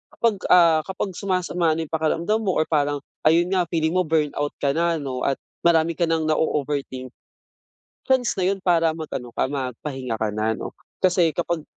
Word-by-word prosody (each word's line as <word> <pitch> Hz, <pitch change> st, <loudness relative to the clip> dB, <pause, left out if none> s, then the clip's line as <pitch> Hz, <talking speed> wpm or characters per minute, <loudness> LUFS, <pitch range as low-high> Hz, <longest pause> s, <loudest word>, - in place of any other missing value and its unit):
kapag, 230 Hz, -2 st, +2 dB, 0.2 s
ah, 170 Hz, -3 st, +6 dB
kapag 190 Hz, +1 st, -4 dB
sumasama 180 Hz, -4 st, 0 dB
na 165 Hz, +1 st, -2 dB
yung -, -, -32 dB
pakiramdam 165 Hz, +6 st, 0 dB
mo 190 Hz, -, +1 dB
or -, -, +3 dB
parang 145 Hz, -2 st, +1 dB, 0.2 s
ayun 170 Hz, +3 st, +4 dB
nga 185 Hz, -2 st, +1 dB
feeling 160 Hz, +1 st, +1 dB
mo 185 Hz, 0 st, +2 dB
burnout 150 Hz, -2 st, 0 dB
ka 140 Hz, -, +2 dB
na, 170 Hz, 0 st, +2 dB
'no, 130 Hz, -2 st, -3 dB
at 140 Hz, -, +2 dB, 0.3 s
marami 165 Hz, -1 st, +3 dB
ka 170 Hz, -, +2 dB
ng 160 Hz, -1 st, 0 dB
na-o-overthink. 140 Hz, -4 st, -1 dB, 1.0 s
Chance 260 Hz, -3 st, +2 dB
na 185 Hz, -, +1 dB
yun -, -, -11 dB
para 165 Hz, -3 st, +3 dB
mag 160 Hz, -1 st, -6 dB
ano 125 Hz, -2 st, -5 dB
ka -, -, 0 dB
magpahinga 130 Hz, -2 st, -4 dB
ka 110 Hz, -, +1 dB
na, 110 Hz, +1 st, 0 dB
'no? -, -, -6 dB, 0.3 s
Kasi 180 Hz, -3 st, +3 dB
kapag 170 Hz, -1 st, -2 dB
160 Hz, 185 wpm, -23 LUFS, 145-175 Hz, 1.0 s, ah